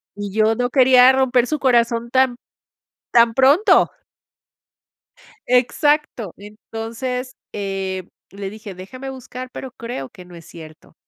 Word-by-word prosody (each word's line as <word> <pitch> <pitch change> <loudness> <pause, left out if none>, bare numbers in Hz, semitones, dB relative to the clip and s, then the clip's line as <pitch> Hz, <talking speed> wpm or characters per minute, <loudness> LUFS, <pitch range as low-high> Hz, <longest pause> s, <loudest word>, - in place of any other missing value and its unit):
Y 205 -1 -6
yo 220 +1 +2
no 245 +1 -1
quería 255 -1 +6
romper 255 -2 +2
su 305 +1 -2
corazón 235 -2 +1
tan 260 -1 +2 0.8
tan 235 -1 +4
pronto. 305 - +4 1.6
Exacto. 250 - +1
Entonces, 230 +5 -6 0.2
eh, 195 -2 -4 0.3
le 195 0 -6
dije: 215 -1 -10
"Déjame 255 +9 -9
buscar, 255 -1 -9
pero 260 - -8
creo 230 - -7
que 180 - -14
no 180 -1 -14
es 165 - -13
cierto". 155 -2 -14
235 Hz, 125 wpm, -20 LUFS, 205-255 Hz, 1.6 s, quería